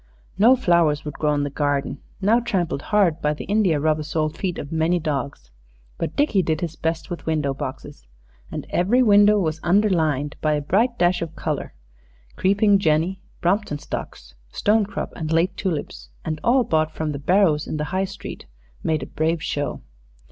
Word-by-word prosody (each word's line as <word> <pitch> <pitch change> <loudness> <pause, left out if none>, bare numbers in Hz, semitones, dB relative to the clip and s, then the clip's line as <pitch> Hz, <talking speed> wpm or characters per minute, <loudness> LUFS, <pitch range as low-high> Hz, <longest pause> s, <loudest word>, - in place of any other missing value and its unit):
No 230 +6 +6
flowers 170 - +2
would 150 - -4
grow 150 -1 0
in 145 - 0
the 145 - -3
garden, 145 -1 -1 0.2
now 215 +5 +4
trampled 185 -11 -1
hard 180 -5 +2
by 150 0 +1
the - - -7
india 200 -7 +2
rubber 155 +1 +1
soled 155 0 -2
feet 180 0 -3
of 145 - -6
many 165 +2 +1
dogs; 140 - -4 0.5
but - - -3
Dickie 285 -10 +2
did 160 -2 -1
his 165 -2 -3
best 165 +3 -3
with 175 - -6
window 150 -3 0
boxes, 130 - -7 0.4
and - - -5
every 230 +9 +3
window 205 -1 +6
was 160 -4 -1
underlined 165 -7 +1
by 155 -1 +2
a 150 - +1
bright 225 - +1
dash 175 0 +2
of 165 -1 -5
color - - -4 0.6
creeping 200 +1 +3
jenny, 165 +2 +1 0.2
Brompton 180 -3 0
stocks, - - -7 0.2
stonecrop, 210 - 0
and 160 -2 -4
late 170 +3 +2
tulips, 145 - -4 0.2
and 155 -1 -3
all 250 +2 +4
bought 155 -6 +1
from 155 -1 -3
the 140 - -5
barrows 165 -1 +2
in - - -3
the 150 - -1
High 190 +1 +1
Street, 195 - -9 0.4
made 155 -1 0
a - - -4
brave 160 +1 -1
show. 145 0 -3
165 Hz, 175 wpm, -22 LUFS, 150-195 Hz, 0.6 s, No